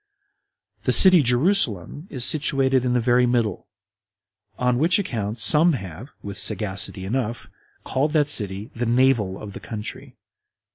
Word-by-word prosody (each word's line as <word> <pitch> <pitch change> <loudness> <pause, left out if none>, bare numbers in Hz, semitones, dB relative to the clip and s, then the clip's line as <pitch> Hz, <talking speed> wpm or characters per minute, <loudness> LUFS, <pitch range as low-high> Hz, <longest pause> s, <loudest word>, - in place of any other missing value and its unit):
The - - +1
city 185 -3 +6
Jerusalem 130 - 0
is 125 -4 0
situated 135 -4 +2
in 125 -1 -1
the 125 - +1
very 125 +1 +1
middle; 115 -6 -2 0.9
on 125 -1 -1
which 165 +5 +2
account 115 - -4
some 155 +8 +5
have, 100 - -8
with 100 0 -3
sagacity 95 -2 -1
enough, 115 +1 -4 0.4
called 145 +3 -2
that 150 -3 +1
city 105 -6 -2
the 120 0 -3
Navel 120 -6 +1
of 105 -2 -10
the - - -9
country. 120 +4 -9
125 Hz, 140 wpm, -21 LUFS, 105-140 Hz, 0.9 s, city